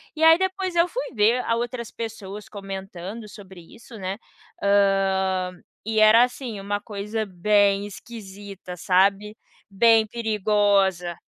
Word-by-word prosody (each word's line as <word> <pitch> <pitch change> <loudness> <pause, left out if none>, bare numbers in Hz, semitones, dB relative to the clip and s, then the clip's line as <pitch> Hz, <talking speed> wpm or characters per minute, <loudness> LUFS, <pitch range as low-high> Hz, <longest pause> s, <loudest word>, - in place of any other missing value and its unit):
E 315 - -2
aí 325 +1 +8
depois 375 -1 -2
eu 340 +1 +4
fui - - -4
ver 230 +3 +2
a 230 - +1
outras 240 0 -4
pessoas 210 -2 -7
comentando 195 +1 -7
sobre 190 -4 -13
isso, 230 0 -13
né, 190 0 -4 0.5
hã, 195 -2 +2 0.3
e 220 -1 0
era, 215 +2 +7
assim, 245 -4 -4
uma 205 +1 -2
coisa 210 +1 -4
bem 200 +2 +2
esquisita, 200 -3 -10
sabe 200 +4 +2 0.4
bem 225 +1 +5
perigosa. 205 -5 +1
205 Hz, 125 wpm, -23 LUFS, 195-230 Hz, 0.5 s, aí